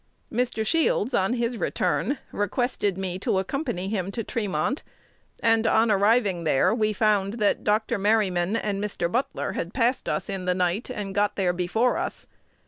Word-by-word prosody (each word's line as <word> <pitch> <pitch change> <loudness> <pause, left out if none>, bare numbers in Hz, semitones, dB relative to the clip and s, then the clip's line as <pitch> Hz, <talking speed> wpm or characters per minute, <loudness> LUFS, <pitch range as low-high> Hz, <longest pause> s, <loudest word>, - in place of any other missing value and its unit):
Mr. 235 -2 0
Shields, 285 -5 +1
on 195 +1 +2
his 235 -1 -1
return, 280 - 0
requested 205 -2 -1
me 185 -1 -3
to 190 - 0
accompany 205 - -2
him 195 -3 -2
to 230 - -3
Tremont; 210 - -1 0.6
and, 225 0 +3
on 220 0 +4
arriving 205 -3 +3
there, 150 +4 +3
we 215 -2 +1
found 210 -1 +1
that 210 -3 +1
Dr. 210 0 +1
Merryman 195 -2 +2
and 205 -2 -1
Mr. 175 -4 -2
Butler 250 +3 -1
had - - -5
passed 250 +1 +1
us - - -1
in 195 -3 -4
the 180 0 +1
night, 180 +6 0
and 205 -5 -4
got 205 +1 +1
there 185 -3 +1
before 180 +8 +1
us. - - -4
210 Hz, 165 wpm, -25 LUFS, 190-230 Hz, 0.6 s, on